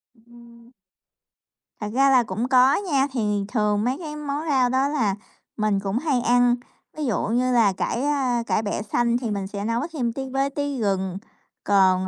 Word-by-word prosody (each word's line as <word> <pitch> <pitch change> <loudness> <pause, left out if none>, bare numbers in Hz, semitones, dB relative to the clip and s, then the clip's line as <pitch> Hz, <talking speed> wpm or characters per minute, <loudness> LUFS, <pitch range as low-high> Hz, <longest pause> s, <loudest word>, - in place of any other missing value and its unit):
Ừm. 235 +1 -18 1.1
Thật 210 -1 -4
ra 275 +1 +4
là 255 -3 +5
cũng 230 +2 -3
có 260 +1 +5
nha. 285 -9 +1
Thì 210 -5 -1
thường 210 -2 0
mấy 255 +3 0
cái 305 -3 -6
món 295 +1 -4
rau 255 -3 +3
đó 265 +2 +2
là 225 -10 0 0.4
mình 210 -2 +1
cũng 195 +2 -2
hay 265 -3 0
ăn, 245 0 +3 0.4
ví 305 - -2
dụ 220 -8 0
như 250 +3 +1
là 215 -5 +4
cải, 235 +5 -2
a, 260 -5 0
cải 220 - 0
bẹ 205 0 -2
xanh 235 +2 0
thì 235 -4 -3
mình 200 -2 -3
sẽ 200 +1 -5
nấu 230 +2 0
thêm 240 -6 -1
tí 265 0 -5
với 270 +1 0
tí 285 -1 -3
gừng. 190 -3 -1 0.5
Còn, 190 -2 +3
240 Hz, 190 wpm, -23 LUFS, 210-270 Hz, 1.1 s, là